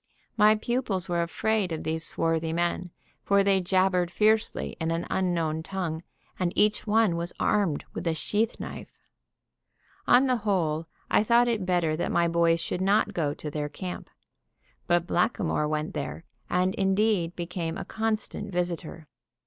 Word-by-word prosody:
My 215 -1 +6
pupils 215 -5 -2
were 175 -1 0
afraid 200 +3 0
of 160 - -3
these 160 +1 -2
swarthy 165 -1 -1
men, 175 +1 -1 0.3
for 200 0 +3
they 195 -1 +3
jabbered 185 -1 +2
fiercely 215 +3 +1
in 160 -1 -1
an 165 +1 -1
unknown 165 -4 0
tongue, 165 -2 -4 0.4
and 180 -2 +1
each 210 +1 +2
one 215 -4 +3
was 170 +1 -3
armed 195 -8 +1
with - - -4
a 165 - +1
sheath 215 +7 -1
knife. - - -7 1.2
On 250 +2 +6
the 255 -2 +2
whole, 165 -7 0 0.2
I - - +4
thought 235 +2 +4
it 215 -6 -1
better 175 -4 +1
that - - -1
my 170 0 +3
boys 170 0 +3
should 180 +2 -3
not 205 +2 +2
go 150 -5 -1
to 150 - -6
their 150 0 -3
camp. 180 +4 -7 0.8
But 175 -1 +2
Blackamoor 175 -5 0
went 155 +1 -2
there, 150 +2 -5 0.3
and 185 +1 +1
indeed 195 -3 +1
became 170 -1 -4
a - - -5
constant 215 -2 -3
visitor. 170 -3 -3
180 Hz, 155 wpm, -27 LUFS, 165-210 Hz, 1.2 s, My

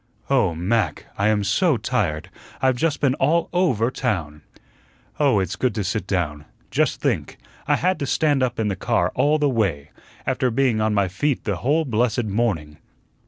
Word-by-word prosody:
"Oh, 115 -11 +3
MAC, 90 -1 -1
I 100 - +1
am 105 -1 +2
so 150 - +2
tired; 95 -13 -2 0.3
I've 130 -1 +2
just 150 +3 -1
been 135 -3 +3
all 170 +2 +1
OVER 130 - +2
town. 85 - -2 0.8
Oh, 140 -8 +3
it's 95 -1 -2
good 120 +4 -1
to 105 - -1
sit 100 +1 -2
down. 75 -6 -2 0.3
Just - - +1
think, - - -1 0.3
I - - +4
had 185 -1 0
to 140 - -2
stand 145 +1 +2
up 125 -2 -1
in 110 - +1
the 100 - -1
car 90 -1 0
all 150 +2 +2
the 150 -1 +2
way, 95 - -1 0.3
after 130 - +1
being 120 -2 +1
on 110 0 +1
my 100 -2 +2
feet 130 +10 -1
the 100 -4 -2
whole 150 - +1
blessed 120 -1 +1
morning. 95 -9 -1
110 Hz, 180 wpm, -22 LUFS, 95-135 Hz, 0.8 s, I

